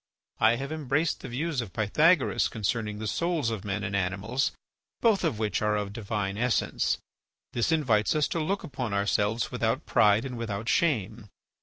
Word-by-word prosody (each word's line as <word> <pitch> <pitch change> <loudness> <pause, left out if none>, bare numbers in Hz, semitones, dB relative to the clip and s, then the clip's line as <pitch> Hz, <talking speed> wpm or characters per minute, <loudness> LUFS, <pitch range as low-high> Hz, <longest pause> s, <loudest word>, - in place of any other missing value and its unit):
I 110 +2 +5
have 135 +4 -5
embraced 155 +1 0
the - - -8
views 140 +2 -1
of 105 -6 -8
Pythagoras 150 - +3
concerning 110 -1 -2
the 110 - -5
souls 160 +1 0
of 110 -4 -4
men 105 +1 -3
and 100 -2 -2
animals, 100 +8 0 0.5
both 220 -5 +3
of 155 -10 0
which 110 -1 -1
are 105 0 +2
of 100 -1 -3
divine 105 -2 -3
essence; 125 0 +1 0.6
this 120 +6 +1
invites 130 -7 +2
us 150 -1 +2
to 165 - -1
look 190 +6 -1
upon 125 -6 -3
ourselves 105 +3 +1
without - - -1
pride 105 +3 +4
and 125 -3 -5
without 110 -1 -4
shame. 115 - 0
115 Hz, 170 wpm, -28 LUFS, 105-145 Hz, 0.6 s, I